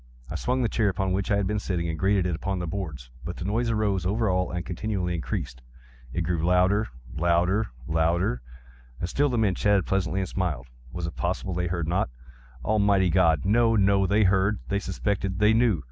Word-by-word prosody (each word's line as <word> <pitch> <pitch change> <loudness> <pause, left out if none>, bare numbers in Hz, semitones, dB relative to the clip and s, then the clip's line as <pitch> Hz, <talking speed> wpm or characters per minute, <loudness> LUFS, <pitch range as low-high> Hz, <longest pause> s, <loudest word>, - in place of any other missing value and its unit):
I - - -4
swung 125 +1 0
the - - +2
chair 110 -1 +1
upon 95 0 -1
which 95 +1 -1
I 100 - +3
had 100 -1 +1
been 105 +2 0
sitting, 90 -4 -2
and 80 -1 -4
grated 95 -1 +2
it 90 - 0
upon 95 +4 -2
the 90 - -3
boards, 80 -10 -5
but 85 +4 -5
the 85 - -5
noise 115 +4 0
arose 105 -4 0
over 105 +2 +1
all 90 0 0
and 90 -1 -4
continually 90 -1 -2
increased. 65 -5 -4 0.5
It 85 - -2
grew 85 -1 -1
louder—louder—louder! 85 - +1 0.6
And 85 - -2
still 145 +7 +2
the 125 - -1
men 105 -4 +2
chatted 100 -1 +2
pleasantly, 95 0 0
and 95 - -2
smiled. 85 -10 -2 0.3
Was 85 +3 -4
it 85 - -6
possible 95 +1 -2
they 90 0 -1
heard 85 -2 -2
not? 90 0 0 0.6
Almighty 100 - +3
God!—no, 95 +7 +3
no! 100 -1 +3
They 105 +3 +3
heard!—they 100 +1 +1
suspected!—they 100 +1 0
knew! 115 -6 +3
95 Hz, 185 wpm, -26 LUFS, 85-100 Hz, 0.6 s, I